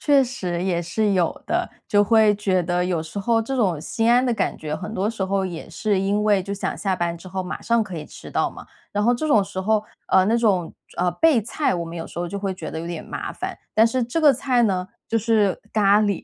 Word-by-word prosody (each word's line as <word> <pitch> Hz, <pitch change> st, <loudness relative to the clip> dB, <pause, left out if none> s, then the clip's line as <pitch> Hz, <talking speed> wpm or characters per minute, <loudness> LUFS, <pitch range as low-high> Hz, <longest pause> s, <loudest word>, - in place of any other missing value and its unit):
确 285 Hz, -2 st, +4 dB
实 180 Hz, -9 st, -3 dB
也 180 Hz, -3 st, 0 dB
是 200 Hz, +5 st, 0 dB
有 180 Hz, -3 st, 0 dB
的， -, -, -1 dB, 0.2 s
就 205 Hz, 0 st, +4 dB
会 215 Hz, 0 st, +5 dB
觉 190 Hz, -3 st, +1 dB
得， 175 Hz, +1 st, 0 dB
有 175 Hz, -3 st, -1 dB
时 160 Hz, +5 st, -7 dB
候 225 Hz, +3 st, +2 dB
这 270 Hz, +5 st, -4 dB
种 195 Hz, -, +1 dB
心 225 Hz, +8 st, 0 dB
安 245 Hz, +2 st, +5 dB
的 250 Hz, -, +1 dB
感 230 Hz, -, -1 dB
觉， 150 Hz, -1 st, -4 dB
很 205 Hz, +7 st, -6 dB
多 200 Hz, +2 st, 0 dB
时 220 Hz, -4 st, -5 dB
候 195 Hz, 0 st, 0 dB
也 175 Hz, -3 st, -6 dB
是 200 Hz, +3 st, 0 dB
因 200 Hz, +2 st, +1 dB
为， 205 Hz, -3 st, +3 dB
就 200 Hz, +2 st, -4 dB
想 200 Hz, -, -3 dB
下 190 Hz, -2 st, -1 dB
班 170 Hz, -1 st, -1 dB
之 185 Hz, +2 st, -11 dB
后 190 Hz, +1 st, -3 dB
马 180 Hz, -, -5 dB
上 235 Hz, -1 st, +2 dB
可 185 Hz, -5 st, -6 dB
以 150 Hz, -, -7 dB
吃 -, -, -11 dB
到 -, -, 0 dB
嘛。 -, -, -12 dB, 0.3 s
然 205 Hz, 0 st, 0 dB
后 240 Hz, +2 st, +4 dB
这 280 Hz, +6 st, -2 dB
种 215 Hz, -8 st, +4 dB
时 195 Hz, -1 st, -5 dB
候， 215 Hz, +2 st, +1 dB, 0.2 s
呃， 190 Hz, -1 st, +5 dB
那 220 Hz, +4 st, +2 dB
种， 195 Hz, -8 st, +1 dB, 0.2 s
呃， 180 Hz, 0 st, +1 dB
备 275 Hz, -, +3 dB
菜， 240 Hz, +3 st, -1 dB
我 170 Hz, -1 st, -2 dB
们 165 Hz, +1 st, -7 dB
有 165 Hz, -, -5 dB
时 -, -, -9 dB
候 175 Hz, -, -1 dB
就 200 Hz, +4 st, -4 dB
会 195 Hz, -1 st, -2 dB
觉 -, -, -7 dB
得 160 Hz, -, -5 dB
有 165 Hz, -, -6 dB
点 170 Hz, -2 st, -5 dB
麻 -, -, -5 dB
烦。 -, -, -5 dB, 0.2 s
但 220 Hz, +1 st, +6 dB
是 250 Hz, +2 st, 0 dB
这 240 Hz, +7 st, -2 dB
个 295 Hz, -2 st, +7 dB
菜 250 Hz, -1 st, +1 dB
呢， 185 Hz, -3 st, 0 dB, 0.2 s
就 225 Hz, -, +1 dB
是 215 Hz, -3 st, +2 dB
咖 205 Hz, -1 st, +4 dB
喱， 205 Hz, -3 st, 0 dB
200 Hz, 280 characters per minute, -23 LUFS, 180-225 Hz, 0.3 s, 个